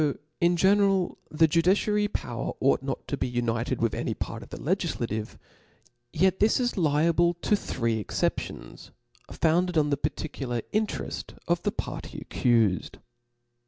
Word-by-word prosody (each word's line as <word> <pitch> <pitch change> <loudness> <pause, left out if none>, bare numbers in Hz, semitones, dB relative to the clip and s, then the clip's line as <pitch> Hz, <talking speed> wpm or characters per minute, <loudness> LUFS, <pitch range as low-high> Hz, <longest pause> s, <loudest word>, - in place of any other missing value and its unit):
Though 145 -2 +1 0.2
in 175 0 +3
general 195 0 +3
the 160 +1 +4
judiciary 195 +6 +2
power 120 - -4
ought 135 0 +3
not 135 0 -4
to 140 - -2
be 130 - -1
united 120 0 -1
with 115 - +1
any - - -2
part - - -5
of - - -12
the - - -7
legiQative, 110 0 -2 0.7
yet 185 +3 +2
this 215 +4 +4
is 245 -1 0
liable 170 +1 +3
to 190 +5 +1
three 115 - -1
exceptions, 105 - -3 0.4
founded 170 +2 +1
on 150 -1 +3
the 140 - +2
particular 140 -4 -3
intereft 215 0 -2
of - - +1
the - - 0
party - - -6
accufcd. 115 -7 +2
155 Hz, 145 wpm, -27 LUFS, 125-185 Hz, 0.7 s, the